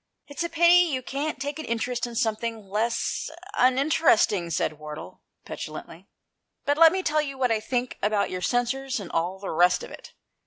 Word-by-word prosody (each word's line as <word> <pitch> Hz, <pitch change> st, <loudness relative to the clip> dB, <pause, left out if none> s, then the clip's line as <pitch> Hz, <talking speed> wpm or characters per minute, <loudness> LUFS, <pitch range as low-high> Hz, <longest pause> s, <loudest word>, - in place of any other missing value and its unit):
"It's 285 Hz, -, -7 dB
a 340 Hz, -, -1 dB
pity 340 Hz, +1 st, +6 dB
you 260 Hz, -2 st, -2 dB
can't 280 Hz, +3 st, -3 dB
take 285 Hz, +3 st, -4 dB
an 315 Hz, -, -5 dB
interest 240 Hz, +2 st, -2 dB
in 235 Hz, -, -9 dB
something 220 Hz, -1 st, -2 dB
less 220 Hz, +8 st, -1 dB, 0.2 s
uninteresting," 255 Hz, -, +3 dB
said 155 Hz, -2 st, -1 dB
Wardle, 150 Hz, 0 st, -9 dB, 0.2 s
petulantly; -, -, -8 dB, 0.6 s
"but 290 Hz, +2 st, +1 dB
let 330 Hz, -1 st, +9 dB
me 375 Hz, 0 st, -2 dB
tell 305 Hz, -1 st, +2 dB
you 275 Hz, -2 st, -5 dB
what 250 Hz, -2 st, +1 dB
I 220 Hz, -, +2 dB
think 245 Hz, +3 st, -3 dB
about 210 Hz, 0 st, +1 dB
your 185 Hz, 0 st, -4 dB
censers 255 Hz, +4 st, -1 dB
and 195 Hz, -, -8 dB
all 175 Hz, +3 st, -1 dB
the 195 Hz, 0 st, -5 dB
rest 180 Hz, +2 st, +3 dB
of -, -, -9 dB
it. -, -, -12 dB
245 Hz, 185 wpm, -26 LUFS, 205-285 Hz, 0.6 s, let